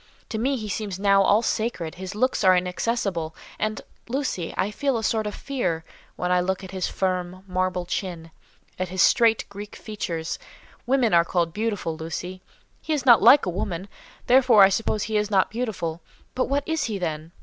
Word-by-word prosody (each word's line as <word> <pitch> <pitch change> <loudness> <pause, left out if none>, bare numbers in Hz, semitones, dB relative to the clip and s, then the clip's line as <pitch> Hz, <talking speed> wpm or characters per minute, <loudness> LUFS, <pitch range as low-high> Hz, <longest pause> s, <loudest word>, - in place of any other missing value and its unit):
To 220 - -3
me 265 +4 +1
he 215 -3 -5
seems 205 -2 -3
now 200 0 +4
all 205 +3 +4
sacred, 215 -9 -2
his 190 +2 -7
locks 255 +1 +1
are 185 -1 +6
inaccessible, 180 -3 -2 0.2
and, 215 0 -1 0.3
Lucy, 255 - -2
I 205 - 0
feel 275 +3 0
a 225 - -4
sort 220 -1 0
of 210 - -5
fear, 180 -13 -2 0.3
when 180 0 -2
I 180 - +4
look 190 +2 -2
at 190 - -8
his 185 -2 -2
firm, 185 -1 -2
marble 185 -1 -1
chin, 170 -3 -4 0.5
at 185 - -1
his 185 -1 +2
straight 225 -2 +4
Greek 205 +1 -9
features. 170 -7 -4 0.5
Women 255 -5 +2
are 170 0 +6
called 170 -1 -1
beautiful, 205 -6 -2
Lucy; 180 +3 -6 0.4
he 315 - -2
is 285 -4 -1
not 240 -3 +7
like 280 - +7
a 180 - -1
woman, 180 0 -4 0.4
therefore 245 -5 +6
I 195 - +7
suppose 210 +1 0
he 220 -1 -1
is 210 0 0
not 195 -2 +2
beautiful, 195 -8 -3 0.3
but 255 - -1
what 280 +1 0
is 320 -2 0
he, 215 -3 -2
then? 160 -3 -4
195 Hz, 190 wpm, -24 LUFS, 180-225 Hz, 0.5 s, not